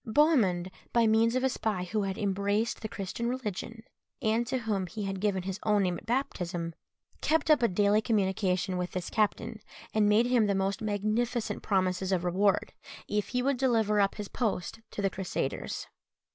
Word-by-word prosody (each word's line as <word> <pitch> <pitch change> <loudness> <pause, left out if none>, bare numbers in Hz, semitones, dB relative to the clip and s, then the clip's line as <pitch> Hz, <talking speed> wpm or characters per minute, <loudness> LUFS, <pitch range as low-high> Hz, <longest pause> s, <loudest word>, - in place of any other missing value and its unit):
Bohemund, 215 - +3 0.2
by 235 -1 +4
means 225 +2 +3
of 255 - +1
a 265 - +3
spy 215 -7 -1
who 210 +4 -1
had 195 -1 -2
embraced 200 +2 0
the 220 - -3
Christian 200 +5 -3
religion, 230 -2 -4 0.4
and 225 +2 +1
to 260 +2 0
whom 210 -6 -1
he 210 +4 -5
had 195 -1 -3
given 200 -3 0
his 190 +1 -4
own 210 -2 +3
name 180 -2 0
at - - -21
baptism, 175 -9 -2 0.5
kept 320 0 +2
up 300 - +5
a 235 - +5
daily 205 +2 +3
communication 190 -4 0
with 180 0 -3
this 180 -1 -4
captain, 220 +1 0 0.3
and 210 -1 +3
made 215 +3 +5
him 245 -3 +3
the 200 - +1
most 195 +1 0
magnificent 215 +3 -1
promises 185 -1 0
of 180 -2 +1
reward, 190 +3 +1 0.3
if 210 0 -1
he 250 0 -1
would 275 0 +1
deliver 225 -5 +2
up 195 -1 +2
his 210 -1 -5
post 220 -3 -2
to 205 - -5
the 195 - +3
Crusaders. 180 -8 -3
210 Hz, 185 wpm, -29 LUFS, 190-230 Hz, 0.5 s, up